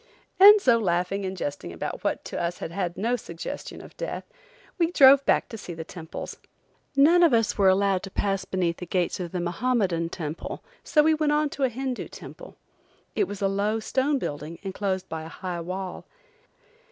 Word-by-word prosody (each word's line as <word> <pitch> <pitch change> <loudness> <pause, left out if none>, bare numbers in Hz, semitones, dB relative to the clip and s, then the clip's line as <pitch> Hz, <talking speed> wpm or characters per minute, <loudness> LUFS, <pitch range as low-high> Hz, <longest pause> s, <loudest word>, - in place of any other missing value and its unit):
And 415 +2 +10
so 240 -10 +4
laughing 185 0 0
and 190 0 -5
jesting 145 - -4
about 85 - -5
what - - -2
had 170 0 -2
to 180 +2 -3
us 175 - -12
no 230 +5 +1
suggestion 170 -8 -7
of - - -14
death, - - -4 0.6
we 335 -1 +3
drove 275 -4 +7
back - - +3
to 225 - -7
see 175 -4 -7
the 160 - -6
temples. 160 -1 -8 0.6
None 315 +6 +6
of 330 -8 +6
us 225 -2 +1
were 195 -2 +4
permitted 195 0 +2
to 195 - -7
pass 195 0 -1
beneath 180 -3 -1
the 180 - -7
gate 180 +1 0
of 175 -2 -4
the 180 - -2
Mahommedan 175 -2 0
temple, 160 -2 -6 0.2
so 300 - +3
we 315 +1 +4
went 305 -1 +1
on 300 0 +2
to 275 - 0
a - - +1
Hindoo 255 +1 -4
temple. - - -11 0.6
It 410 - +2
was 205 -1 -6
a - - +4
low 205 +3 0
stone 270 +6 0
building, 155 - -5
enclosed 190 -1 -2
by 160 -1 -5
a 160 - -8
high 175 +1 -5
wall. 185 +2 -6
195 Hz, 190 wpm, -26 LUFS, 175-260 Hz, 0.6 s, And